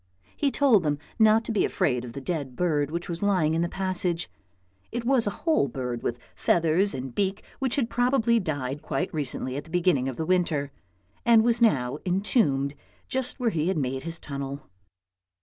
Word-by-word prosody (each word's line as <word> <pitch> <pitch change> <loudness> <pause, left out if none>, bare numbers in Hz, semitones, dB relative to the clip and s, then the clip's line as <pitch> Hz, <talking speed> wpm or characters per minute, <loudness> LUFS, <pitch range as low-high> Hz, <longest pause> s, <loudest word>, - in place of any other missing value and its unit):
He 285 - +1
told 265 -7 +4
them 150 -3 0 0.2
not 220 +1 +5
to - - -3
be 215 - +2
afraid 125 -4 0
of 120 -2 -8
the 140 - -6
dead 140 -4 -3
bird 150 -4 +1
which 170 +2 -3
was 170 -1 -4
lying 185 -6 +2
in 165 - +1
the 170 - 0
passage. 180 -3 -1 0.6
It 235 +1 -4
was 250 -4 +3
a 200 - -4
whole 315 - +3
bird 125 -2 -4
with 120 - -2 0.2
feathers 175 +4 +2
and 130 -1 -5
beak 195 0 -1 0.2
which 265 -2 0
had 270 -6 +1
probably 245 -1 +2
died 145 - -3
quite 180 - -2
recently 135 -3 -2
at 145 - -5
the - - -15
beginning 170 -6 +2
of 130 - -5
the 160 - -2
winter, 160 -6 +1 0.5
and 230 -2 +6
was 235 0 +2
now 135 - +2
entombed 180 - +1 0.4
just 260 0 -2
where 240 -3 +1
he 160 -1 0
had 190 - 0
made 130 -2 -1
his 165 +2 -4
tunnel. 140 -1 -6
170 Hz, 190 wpm, -26 LUFS, 140-215 Hz, 0.6 s, and